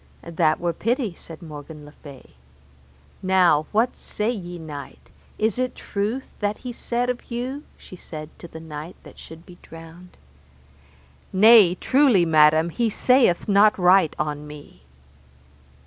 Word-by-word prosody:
That 160 Hz, -2 st, 0 dB
were 170 Hz, -1 st, -1 dB
pity, 230 Hz, -, -2 dB
said 165 Hz, 0 st, -13 dB
Morgan 150 Hz, -1 st, -10 dB
le 145 Hz, -, -13 dB
Fay. 140 Hz, -3 st, -15 dB, 0.9 s
Now, 180 Hz, -5 st, +3 dB
what 230 Hz, +4 st, +1 dB
say 215 Hz, +3 st, -3 dB
ye, 175 Hz, -6 st, -7 dB
knight, 150 Hz, -4 st, -10 dB, 0.3 s
is 220 Hz, +2 st, -1 dB
it 255 Hz, 0 st, -2 dB
truth 215 Hz, +6 st, -4 dB
that 205 Hz, 0 st, -2 dB
he 245 Hz, -, -5 dB
saith 240 Hz, +1 st, -2 dB
of 250 Hz, -1 st, -5 dB
you? 255 Hz, +4 st, -5 dB
she -, -, -13 dB
said 155 Hz, -3 st, -9 dB
to 170 Hz, -, -10 dB
the 160 Hz, -, -11 dB
knight 160 Hz, +1 st, -9 dB
that -, -, -15 dB
should 160 Hz, +1 st, -13 dB
be 175 Hz, -1 st, -16 dB
drowned. 165 Hz, +2 st, -14 dB, 1.1 s
Nay 205 Hz, -2 st, +6 dB
truly, 255 Hz, -7 st, +3 dB
madam, 155 Hz, +1 st, +4 dB
he 235 Hz, +6 st, 0 dB
saith 245 Hz, -4 st, +2 dB
not 210 Hz, +1 st, +4 dB
right 180 Hz, -2 st, +4 dB
on 150 Hz, 0 st, -4 dB
me. 145 Hz, -, -13 dB
180 Hz, 145 wpm, -22 LUFS, 155-220 Hz, 1.1 s, Nay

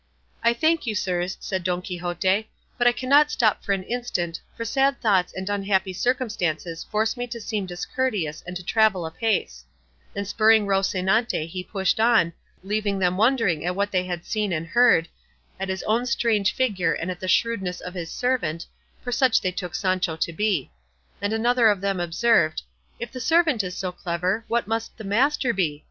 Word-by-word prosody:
'" -, -, -32 dB
"I 235 Hz, 0 st, +4 dB
thank 315 Hz, +1 st, +1 dB
you, 215 Hz, -, -1 dB
sirs," 180 Hz, -1 st, -1 dB
said 190 Hz, -2 st, -3 dB
Don 180 Hz, 0 st, -1 dB
Quixote; 180 Hz, +4 st, -1 dB, 0.3 s
"but 245 Hz, -1 st, +2 dB
I -, -, +7 dB
cannot 280 Hz, +5 st, +4 dB
stop 220 Hz, -7 st, +1 dB
for -, -, -2 dB
an 195 Hz, -1 st, 0 dB
instant, 185 Hz, -8 st, -3 dB, 0.2 s
for 230 Hz, -, -4 dB
sad 275 Hz, +3 st, +1 dB
thoughts 195 Hz, -6 st, +2 dB
and 190 Hz, 0 st, -6 dB
unhappy 195 Hz, -2 st, 0 dB
circumstances 180 Hz, -9 st, -1 dB
force 220 Hz, +2 st, 0 dB
me 245 Hz, 0 st, -4 dB
to 235 Hz, 0 st, -6 dB
seem 210 Hz, -3 st, -3 dB
discourteous 180 Hz, -, -2 dB
and 180 Hz, 0 st, -4 dB
to 180 Hz, -, -10 dB
travel 215 Hz, -3 st, +2 dB
apace;" 160 Hz, -, -1 dB, 0.5 s
and 200 Hz, 0 st, -3 dB
spurring 220 Hz, 0 st, +4 dB
Rocinante 195 Hz, 0 st, +1 dB
he 180 Hz, +2 st, -5 dB
pushed 190 Hz, +2 st, -1 dB
on, 220 Hz, -7 st, +4 dB, 0.3 s
leaving 205 Hz, 0 st, -1 dB
them 180 Hz, -1 st, +1 dB
wondering 220 Hz, -, +2 dB
at 180 Hz, +1 st, -1 dB
what 200 Hz, +1 st, -1 dB
they 185 Hz, -1 st, +1 dB
had 175 Hz, -2 st, -5 dB
seen 210 Hz, -3 st, -1 dB
and 165 Hz, -1 st, -2 dB
heard, 170 Hz, -3 st, +4 dB, 0.5 s
at 195 Hz, 0 st, -3 dB
his 190 Hz, 0 st, -3 dB
own 230 Hz, +3 st, +1 dB
strange 220 Hz, -4 st, +2 dB
figure 195 Hz, -10 st, 0 dB
and 175 Hz, +2 st, -3 dB
at 180 Hz, -, -7 dB
the 185 Hz, -, -5 dB
shrewdness 190 Hz, -3 st, +1 dB
of 180 Hz, -, -8 dB
his 170 Hz, -3 st, -5 dB
servant, 245 Hz, -11 st, -1 dB, 0.4 s
for 245 Hz, -, -4 dB
such 250 Hz, -1 st, +3 dB
they 185 Hz, -, 0 dB
took 180 Hz, -1 st, -5 dB
Sancho 185 Hz, -3 st, 0 dB
to 165 Hz, +1 st, -2 dB
be; 200 Hz, -6 st, 0 dB, 0.5 s
and 205 Hz, +1 st, -1 dB
another 235 Hz, +1 st, +3 dB
of 205 Hz, -2 st, +1 dB
them 195 Hz, -1 st, -1 dB
observed, 170 Hz, -2 st, +2 dB, 0.4 s
"If 235 Hz, 0 st, -5 dB
the 255 Hz, -, -7 dB
servant 310 Hz, -4 st, +3 dB
is 180 Hz, -1 st, -5 dB
so 185 Hz, -2 st, -3 dB
clever, 180 Hz, +5 st, -2 dB
what 235 Hz, 0 st, 0 dB
must 225 Hz, +1 st, -3 dB
the 220 Hz, -, -8 dB
master 245 Hz, +5 st, +1 dB
be? 155 Hz, -7 st, -1 dB
200 Hz, 190 wpm, -24 LUFS, 180-230 Hz, 0.5 s, I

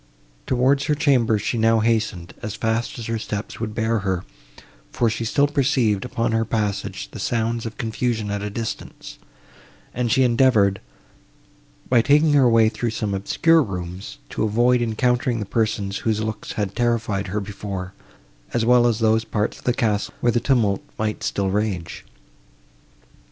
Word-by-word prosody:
Towards 130 Hz, +2 st, +2 dB
her 150 Hz, -, +1 dB
chamber 130 Hz, -7 st, +3 dB
she 110 Hz, +3 st, -2 dB
now 115 Hz, 0 st, +4 dB
hastened, 110 Hz, -6 st, -1 dB
as 110 Hz, -3 st, -5 dB
fast 115 Hz, +1 st, -1 dB
as 115 Hz, -, -6 dB
her 115 Hz, 0 st, -2 dB
steps 105 Hz, -1 st, -5 dB
would 110 Hz, -2 st, -4 dB
bear 115 Hz, 0 st, +1 dB
her, 95 Hz, -2 st, -2 dB, 0.6 s
for 115 Hz, -2 st, +1 dB
she 110 Hz, +1 st, -3 dB
still 140 Hz, +5 st, +2 dB
perceived, 130 Hz, -, +1 dB
upon 120 Hz, -2 st, -1 dB
her 115 Hz, 0 st, +1 dB
passage, 105 Hz, -, -2 dB
the -, -, -8 dB
sounds 115 Hz, 0 st, -1 dB
of 110 Hz, -, -9 dB
confusion 110 Hz, -2 st, -2 dB
at 100 Hz, 0 st, -2 dB
a 105 Hz, -, -3 dB
distance, 110 Hz, -1 st, -6 dB, 0.7 s
and 120 Hz, -1 st, -1 dB
she 130 Hz, +1 st, +4 dB
endeavoured, 115 Hz, -6 st, +3 dB, 1.1 s
by 120 Hz, -2 st, +4 dB
taking 150 Hz, +4 st, +4 dB
her 135 Hz, -4 st, +5 dB
way 115 Hz, -1 st, +5 dB
through 120 Hz, +1 st, -2 dB
some 110 Hz, -2 st, -3 dB
obscure 160 Hz, +12 st, +3 dB
rooms, 90 Hz, -, -6 dB
to -, -, -4 dB
avoid 120 Hz, +3 st, +3 dB
encountering 120 Hz, +1 st, 0 dB
the 105 Hz, -, -3 dB
persons, 105 Hz, -2 st, -1 dB
whose 110 Hz, -2 st, 0 dB
looks 110 Hz, 0 st, -5 dB
had 100 Hz, -2 st, -3 dB
terrified 115 Hz, -5 st, 0 dB
her 100 Hz, +3 st, -2 dB
before, 100 Hz, -2 st, -6 dB, 0.6 s
as 115 Hz, -2 st, +1 dB
well 120 Hz, 0 st, +5 dB
as 115 Hz, -3 st, +1 dB
those 110 Hz, 0 st, +3 dB
parts 110 Hz, -2 st, -2 dB
of -, -, -20 dB
the 125 Hz, -, +3 dB
castle, 110 Hz, -4 st, -1 dB
where 120 Hz, -, +2 dB
the 120 Hz, -, +1 dB
tumult 115 Hz, -7 st, +1 dB, 0.2 s
might 110 Hz, 0 st, -2 dB
still 100 Hz, -1 st, -1 dB
rage. 100 Hz, -5 st, -2 dB
110 Hz, 165 wpm, -22 LUFS, 105-120 Hz, 1.1 s, her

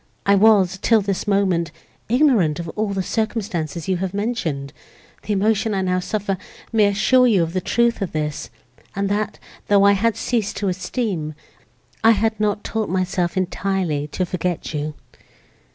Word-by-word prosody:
I 200 Hz, -, +5 dB
was, 195 Hz, -2 st, +4 dB
till 225 Hz, -2 st, +4 dB
this 195 Hz, +1 st, -2 dB
moment, 185 Hz, -5 st, +1 dB, 0.4 s
ignorant 235 Hz, -, +3 dB
of 170 Hz, -, -5 dB
all 215 Hz, +5 st, -2 dB
the 195 Hz, -1 st, -2 dB
circumstances 190 Hz, -8 st, -2 dB
you 190 Hz, -1 st, +1 dB
have 190 Hz, +1 st, -3 dB
mentioned; 165 Hz, -, -2 dB, 0.5 s
the 210 Hz, -, -2 dB
emotion 210 Hz, +1 st, +1 dB
I 190 Hz, -, 0 dB
now 185 Hz, 0 st, +1 dB
suffer 195 Hz, 0 st, -2 dB, 0.3 s
may 215 Hz, -2 st, +5 dB
assure 250 Hz, +5 st, +4 dB
you 200 Hz, -7 st, +4 dB
of 165 Hz, 0 st, -4 dB
the 185 Hz, -, -1 dB
truth 235 Hz, +3 st, +1 dB
of 195 Hz, -, -2 dB
this, 150 Hz, -1 st, -3 dB, 0.5 s
and, 200 Hz, 0 st, -1 dB
that, 205 Hz, +1 st, -1 dB, 0.3 s
though 200 Hz, -1 st, +5 dB
I 200 Hz, -, +7 dB
had 215 Hz, +3 st, +2 dB
ceased 220 Hz, -4 st, -1 dB
to 200 Hz, -, 0 dB
esteem, 180 Hz, -, -3 dB, 0.7 s
I 225 Hz, +1 st, +7 dB
had 220 Hz, 0 st, 0 dB
not 210 Hz, -1 st, 0 dB
taught 220 Hz, -1 st, -2 dB
myself 185 Hz, 0 st, -1 dB
entirely 185 Hz, -5 st, -1 dB
to 185 Hz, +4 st, -2 dB
forget 180 Hz, -2 st, -3 dB
you." 150 Hz, 0 st, -3 dB
195 Hz, 165 wpm, -21 LUFS, 180-215 Hz, 0.7 s, I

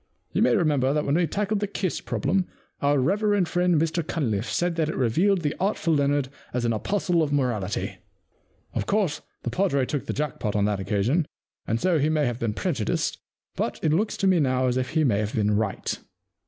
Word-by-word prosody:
You -, -, +1 dB
may -, -, +4 dB
remember 145 Hz, -, +2 dB
that 150 Hz, 0 st, 0 dB
when 140 Hz, -, +1 dB
we 170 Hz, +1 st, +3 dB
tackled 205 Hz, +5 st, -1 dB
the 205 Hz, -, -1 dB
Kiss 190 Hz, -3 st, -2 dB
Problem, 180 Hz, +6 st, 0 dB, 0.3 s
our 145 Hz, 0 st, +3 dB
reverend 200 Hz, +6 st, +2 dB
friend 175 Hz, -1 st, +2 dB
Mr 165 Hz, +2 st, +1 dB
CunlifFe 125 Hz, -10 st, -2 dB
said 175 Hz, -1 st, 0 dB
that 160 Hz, -2 st, +1 dB
it -, -, -3 dB
revealed 170 Hz, -, +2 dB
the 150 Hz, -, 0 dB
artful 185 Hz, -4 st, +1 dB
Leonard 140 Hz, -2 st, +1 dB, 0.3 s
as 125 Hz, -1 st, 0 dB
an 115 Hz, -, +2 dB
apostle 175 Hz, -, 0 dB
of 150 Hz, -2 st, 0 dB
morality. 120 Hz, -9 st, -1 dB, 0.8 s
Of -, -, -2 dB
course, 195 Hz, -7 st, +1 dB, 0.2 s
the -, -, -2 dB
padre 140 Hz, -9 st, +1 dB
took 145 Hz, +1 st, -3 dB
the -, -, -1 dB
jack 150 Hz, -1 st, -3 dB
pot 105 Hz, -2 st, -2 dB
on 100 Hz, -1 st, +2 dB
that 105 Hz, -2 st, 0 dB
occasion, 105 Hz, -, +1 dB, 0.4 s
and 115 Hz, -, 0 dB
so 175 Hz, 0 st, +2 dB
he 145 Hz, +2 st, +2 dB
may 155 Hz, -2 st, +2 dB
have 120 Hz, -1 st, -2 dB
been 110 Hz, -3 st, -1 dB
prejudiced, 130 Hz, -, -1 dB, 0.4 s
but -, -, -2 dB
it 155 Hz, -, +3 dB
looks 210 Hz, +6 st, 0 dB
to -, -, 0 dB
me 185 Hz, -2 st, +4 dB
now 130 Hz, -3 st, +2 dB
as 125 Hz, -1 st, +1 dB
if 130 Hz, -1 st, -1 dB
he 160 Hz, -1 st, +1 dB
may 110 Hz, -8 st, +2 dB
have 110 Hz, +1 st, -2 dB
been 105 Hz, -1 st, +2 dB
right. 105 Hz, -2 st, -1 dB
145 Hz, 210 wpm, -25 LUFS, 125-175 Hz, 0.8 s, may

